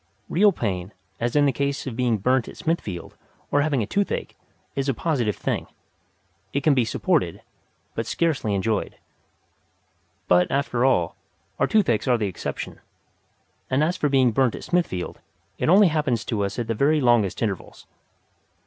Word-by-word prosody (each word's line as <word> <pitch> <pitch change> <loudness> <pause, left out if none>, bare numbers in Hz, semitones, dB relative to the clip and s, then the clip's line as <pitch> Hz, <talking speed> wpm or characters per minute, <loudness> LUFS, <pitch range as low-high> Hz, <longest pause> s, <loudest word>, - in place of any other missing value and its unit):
Real 205 +4 +5
pain, 95 - -3 0.3
as 120 +3 -1
in 145 -1 +5
the 140 - +4
case 140 +2 -2
of 130 -4 -5
being 120 -2 +1
burnt 125 +4 +1
at - - -10
Smithfield 105 - -3 0.4
or 145 - +3
having 140 -5 +1
a - - -2
toothache, 200 - -2 0.4
is 135 0 -1
a 135 - +1
positive 120 - 0
thing; - - -2 0.9
it 140 - -1
can 150 - +5
be 130 -3 +3
supported, - - 0 0.5
but - - -3
scarcely 145 -11 0
enjoyed. 105 +2 -1 1.3
But, 90 0 +4
after 135 -3 0
all, 90 -11 +2 0.4
our - - +3
toothaches 180 - +2
are 125 -2 +4
the 110 - -1
exception, 95 - -5 0.9
and 135 +3 +2
as 170 +3 +1
for 145 - 0
being 130 -3 +4
burnt 125 +1 +2
at - - -8
Smithfield, 170 - -1 0.4
it - - +1
only 195 +1 +7
happens 145 -9 0
to 105 -3 -1
us 100 - -5
at 120 - -1
the 115 - -1
very 145 +7 +3
longest 120 -7 +3
intervals. 100 -5 -4
125 Hz, 165 wpm, -24 LUFS, 110-145 Hz, 1.3 s, only